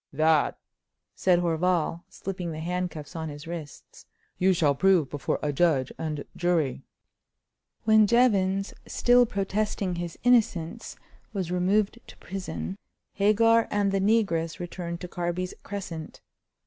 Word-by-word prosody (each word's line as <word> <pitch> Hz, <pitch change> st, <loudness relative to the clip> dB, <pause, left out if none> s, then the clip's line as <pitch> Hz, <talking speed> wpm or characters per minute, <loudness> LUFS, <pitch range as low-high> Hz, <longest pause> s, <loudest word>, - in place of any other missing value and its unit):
"That," 155 Hz, +1 st, +2 dB, 0.6 s
said 180 Hz, -2 st, +3 dB
Horval, 170 Hz, 0 st, 0 dB
slipping 180 Hz, -3 st, -5 dB
the 155 Hz, -, -6 dB
handcuffs 175 Hz, -2 st, -4 dB
on 160 Hz, -1 st, -4 dB
his 145 Hz, 0 st, -9 dB
wrists, 165 Hz, -4 st, -9 dB, 0.3 s
"you 190 Hz, +1 st, +4 dB
shall 165 Hz, -6 st, +3 dB
prove 175 Hz, -2 st, +3 dB
before 145 Hz, -, -1 dB
a 145 Hz, -1 st, 0 dB
judge 140 Hz, -4 st, +2 dB
and 155 Hz, -2 st, -4 dB
jury." 170 Hz, -6 st, 0 dB, 1.0 s
When 220 Hz, -1 st, +5 dB
Jevons, 195 Hz, -5 st, +2 dB
still 245 Hz, 0 st, +4 dB
protesting 200 Hz, -3 st, -1 dB
his 170 Hz, -1 st, -5 dB
innocence, 225 Hz, -5 st, +1 dB, 0.4 s
was 185 Hz, -4 st, -3 dB
removed 195 Hz, +5 st, +1 dB
to -, -, -13 dB
prison, 195 Hz, +1 st, -6 dB, 0.3 s
Hagar 225 Hz, +3 st, +4 dB
and 205 Hz, -1 st, +1 dB
the 195 Hz, 0 st, +1 dB
negress 195 Hz, -6 st, +1 dB
returned 175 Hz, -1 st, -6 dB
to 180 Hz, -, -5 dB
Carby's 175 Hz, +1 st, -3 dB
Crescent. 175 Hz, -6 st, -7 dB
180 Hz, 125 wpm, -27 LUFS, 165-200 Hz, 1.0 s, When